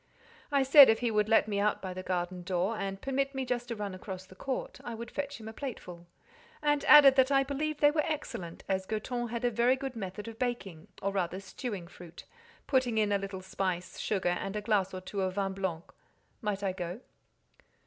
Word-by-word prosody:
I 280 -1 +4
said 275 +1 +9
if 220 - +4
he 240 -2 +1
would 210 0 +1
let 225 - +5
me 200 -2 -1
out 210 +1 +1
by 185 -1 -5
the 185 - -5
garden 180 0 -2
door, 185 +4 -1
and 195 -2 -4
permit 275 +3 -1
me 265 -1 -2
just 245 -1 -2
to 235 - -3
run 205 -2 -4
across 185 0 -7
the 185 - -15
court, 260 +7 -4
I 235 - -5
would 235 +1 -7
fetch 285 -2 -4
him 220 - -9
a 220 - -7
plateful; 180 -10 -7 0.5
and 295 -1 +1
added 280 -3 +9
that 260 +1 +5
I 275 0 +5
believed 295 +2 -3
they 290 0 +6
were 305 0 +2
excellent, 185 - -5
as 190 -1 -1
Goton 240 +2 -3
had 235 +1 -3
a 245 - +2
very 240 +3 +3
good 265 -1 -5
method 205 0 -6
of 225 -1 -9
baking, 195 -10 -3 0.2
or 200 - +1
rather 185 -1 -1
stewing 195 -2 -6
fruit, 170 -1 -12 0.4
putting 255 -4 +1
in 210 -1 +2
a 200 - +2
little 195 -1 -6
spice, 185 -2 -3
sugar, 190 -4 0
and 195 +3 -2
a 210 - -1
glass 205 -3 +1
or 185 - -6
two 195 +1 -4
of 185 -1 -1
vin 195 -1 -1
blanc—might 195 +3 -6
I 195 - +1
go? 180 +4 -5
210 Hz, 215 wpm, -30 LUFS, 190-255 Hz, 0.5 s, said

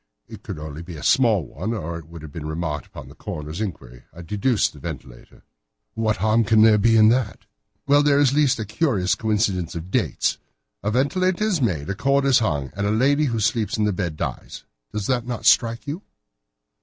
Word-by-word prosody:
It - - -11
could - - -7
only 75 0 -7
be 85 0 -9
a 75 - -9
small 110 - +3
one, 90 - -4
or 85 -4 -4
it 80 - -14
would 85 -1 -11
have 75 - -9
been 75 0 -6
remarked 80 -1 -4
upon - - -10
at - - -14
the - - -13
coroner's 75 +5 -5
inquiry. 60 - -7
I 85 - -11
deduced 105 +6 0
a - - -13
ventilator." - - -9 0.5
"But 115 - -4
what 110 -1 +1
harm 110 +1 +2
can 110 0 +4
there 110 -1 +6
be 115 +2 +4
in 110 0 +7
that?" 125 +1 -1 0.4
"Well, 145 +1 +5
there 145 -1 +3
is 145 -2 +5
at - - -2
least 145 -3 +3
a 110 - -3
curious 105 - 0
coincidence 100 -6 -1
of 85 +3 -7
dates. - - 0 0.4
A 105 - -1
ventilator 180 - +1
is 200 -8 +1
made, 80 - -1
a - - -1
cord 140 +7 +1
is 135 -2 +5
hung, 75 - -1
and 100 +1 -1
a - - +1
lady 140 +7 +3
who 115 -5 -1
sleeps 110 +1 0
in 105 - +1
the 105 -1 +1
bed 85 -4 -3
dies. - - -5 0.3
Does 105 -2 -3
not 125 -2 0
that 120 -3 -5
strike 115 -1 +3
you?" 150 +6 -5
110 Hz, 220 wpm, -22 LUFS, 85-125 Hz, 0.5 s, in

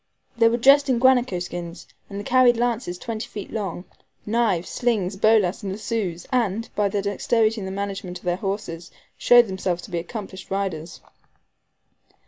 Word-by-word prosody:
They 230 -1 +5
were 235 - 0
dressed 275 +3 +5
in 255 - +3
guanaco 250 -5 +3
skins, 175 -1 -6 0.2
and 200 0 -6
carried 255 -2 +4
lances 235 -6 -1
twenty 225 +2 -5
feet 205 -2 -8
long, 195 -4 -4 0.4
knives, 210 -6 +1
slings, 210 -6 -1
bolas, 215 0 +3
and 195 -2 -4
lassos, 195 -4 -3
and, 230 -3 0
by 205 -1 +1
their 200 0 -2
dexterity 220 +2 +1
in - - -5
the 190 - -5
management 195 -2 -4
of - - -18
their 175 0 0
horses, 195 -4 -4 0.3
showed 245 0 +6
themselves 190 -3 -3
to 205 - -11
be 170 - -1
accomplished 190 +1 -8
riders. 185 -5 -4
205 Hz, 160 wpm, -23 LUFS, 185-230 Hz, 0.4 s, showed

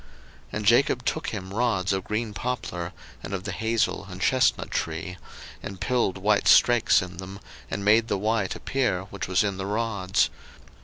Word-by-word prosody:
01:030:037 - - -23 0.5
And 105 - -4
Jacob 120 +6 +4
took - - -1
him 95 +1 -5
rods 105 -5 +1
of 95 -1 -1
green 110 +1 -3
poplar, 105 -8 -3 0.3
and 100 - -4
of 95 - -5
the - - -4
hazel 115 0 0
and - - -8
chesnut - - +2
tree; 80 +3 -3 0.5
and 100 -2 -7
pilled 120 -7 0
white 105 +2 +2
strakes 120 -6 +5
in 90 -1 -9
them, 95 +2 -8 0.3
and 100 - -3
made 110 +2 +5
the - - 0
white 105 -1 0
appear 120 -9 -1
which 100 -3 -4
was 95 +3 +3
in 100 -2 -2
the 95 0 -4
rods. 100 -3 0
100 Hz, 175 wpm, -26 LUFS, 95-115 Hz, 0.5 s, strakes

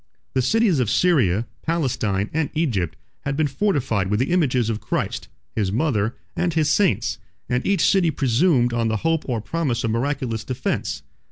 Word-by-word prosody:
The 130 - +2
cities 190 - +3
of 120 -5 +1
Syria, 120 - +3 0.2
Palestine, 115 - -1
and 160 -1 0
Egypt 115 - 0 0.2
had 140 0 -3
been 155 - +2
fortified 135 - 0
with 105 +1 +1
the 130 +6 0
images 130 -10 +2
of 110 -1 -2
Christ, - - -2 0.3
his 100 -4 0
mother, 115 -3 0 0.2
and 175 -2 0
his 155 -2 +2
saints; 200 -1 +1 0.3
and 125 +1 0
each 200 -1 +3
city 190 -4 +3
presumed 130 -2 +2
on 115 -1 +1
the 110 0 0
hope 165 -3 +1
or 120 -3 0
promise 130 -3 -1
of 115 - 0
miraculous 115 -2 -1
defence. 130 +2 -3
130 Hz, 170 wpm, -22 LUFS, 115-160 Hz, 0.3 s, cities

